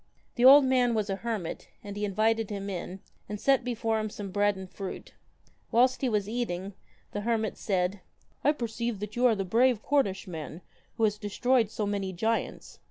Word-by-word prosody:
The 240 - -1
old 275 +1 +10
man 250 -2 +3
was 210 -2 -1
a 195 - -2
hermit, 215 -6 -4 0.2
and 200 -1 -7
he 205 0 -1
invited 220 +2 +1
him 200 -1 -4
in, 185 +1 -6 0.3
and 210 0 -4
set 270 +1 +3
before 225 -2 -1
him 215 0 -2
some 200 -2 -7
bread 205 +1 +2
and 190 0 -8
fruit. 195 +1 -7 0.6
Whilst 255 +2 +3
he 260 - +1
was 210 -3 0
eating, 200 -5 -3 0.4
the 205 - -3
hermit 220 -1 0
said: 190 0 -1 0.2
' - - -37
I 295 - +4
perceive 235 -4 -3
that 210 0 -5
you 250 +1 +4
are 230 - +3
the 195 -1 -2
brave 230 +3 +3
Cornishman 185 - -1 0.4
who 225 - 0
has 210 -1 +2
destroyed 225 +2 +1
so 215 -1 -3
many 200 -2 -2
giants. 225 +6 -2
215 Hz, 190 wpm, -28 LUFS, 195-235 Hz, 0.6 s, old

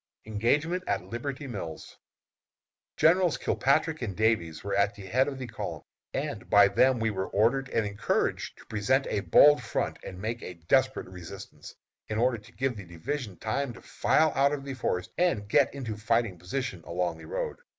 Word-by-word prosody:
ENGAGEMENT 145 - +1
AT - - 0
LIBERTY 135 +4 -4
MILLS. 95 - -7 1.0
Generals 175 0 +4
Kilpatrick 155 +3 +1
and 105 -6 -3
Davies 95 -8 +1
were 100 0 -3
at 100 +1 +2
the 100 -2 -10
head 130 +8 +2
of 140 -2 -4
the 130 - -5
column, - - -6 0.3
and - - -4
by 100 0 +7
them 130 +4 +3
we 110 -1 +1
were 95 -2 -3
ordered 125 +6 +2
and 115 -2 0
encouraged 100 0 -1
to - - -16
present 125 +6 +1
a - - +1
bold 145 +8 +6
front - - -2
and 90 - -8
make 115 +4 -3
a 90 - -7
desperate 130 +11 +1
resistance, 90 -2 -10 0.3
in 110 - -3
order 120 0 +2
to 105 - -17
give 130 -1 -1
the 100 - -8
division 95 - -5
time 125 +3 -2
to - - -13
file 155 0 +2
out 140 +1 +3
of 140 -1 -4
the 140 - -4
forest 90 -8 -2
and 175 -11 +2
to - - -12
get - - +4
into 130 -6 -5
a - - -9
fighting 115 -2 +1
position 95 +1 -4
along 85 -1 -2
the 80 - -11
road. - - -3
115 Hz, 190 wpm, -28 LUFS, 100-135 Hz, 1.0 s, by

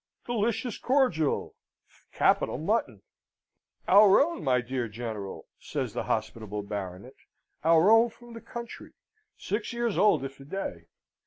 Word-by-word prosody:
Delicious 230 0 -1
cordial! 250 - +1 0.6
Capital - - +2
mutton! 150 - -1 0.8
Our 200 +1 +7
own, 335 +4 0
my 130 -3 +3
dear 120 0 -3
General," 110 -3 -6
says - - -4
the - - -3
hospitable 105 -2 -3
Baronet, 100 +3 -6 0.5
"our 165 +5 +5
own 225 +1 +6
from 235 +1 -15
the 230 - -9
country, 235 -1 -9 0.4
six 210 +4 -3
years 235 -3 -1
old 205 -10 +4
if 135 0 -9
a 135 - -12
day. 135 - -5
165 Hz, 130 wpm, -28 LUFS, -, 0.8 s, Our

